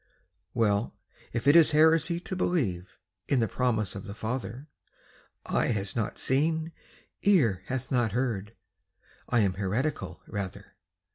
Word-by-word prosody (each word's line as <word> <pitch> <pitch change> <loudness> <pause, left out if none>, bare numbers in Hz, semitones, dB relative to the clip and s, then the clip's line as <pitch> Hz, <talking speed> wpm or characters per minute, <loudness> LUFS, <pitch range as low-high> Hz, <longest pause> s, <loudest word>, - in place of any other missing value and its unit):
Well, 105 -1 +1 0.4
if 120 0 -3
it 145 - +7
is 165 -3 +7
heresy 160 +2 +4
to 185 - -5
believe 100 - -1 0.3
In 135 - +2
the 115 - +2
promise 110 -6 0
of 100 -1 -7
the 100 0 -7
Father, 120 +3 -4 0.8
"Eye - - +1
hath 100 -4 -2
not 110 -3 -2
seen, 160 +4 +1 0.5
ear 135 - +3
hath 130 -1 -3
not 120 -5 +1
heard," 115 -4 -2 0.7
I 120 -2 +3
am 100 -3 +2
heretical, 105 - -2
rather. 100 -3 -6
120 Hz, 135 wpm, -28 LUFS, 100-145 Hz, 0.8 s, it